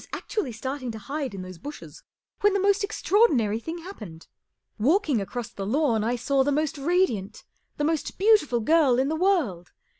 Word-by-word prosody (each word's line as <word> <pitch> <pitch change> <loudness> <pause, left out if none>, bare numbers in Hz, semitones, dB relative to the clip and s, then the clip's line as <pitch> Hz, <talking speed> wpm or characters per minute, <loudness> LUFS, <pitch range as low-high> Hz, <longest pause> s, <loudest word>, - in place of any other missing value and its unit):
M - - -4 1.2
those 185 -1 -8
bushes 290 - -9 0.4
when 410 -1 +3
the 400 - +1
most 400 +2 +2
extraordinary 350 - +2
thing 325 +8 -6
happened. 210 - -10 0.5
Walking 290 - +2
across 235 +4 -5
the 200 - -7
lawn 230 0 +1
I 235 +3 0
saw 270 +3 +1
the 285 - 0
most 300 0 -1
radiant, 275 - 0 0.3
the 295 - -1
most 315 0 -1
beautiful 385 - +3
girl 285 -1 +4
in 265 +2 +1
the 315 - -1
world. 315 - 0
285 Hz, 150 wpm, -25 LUFS, 225-355 Hz, 1.2 s, girl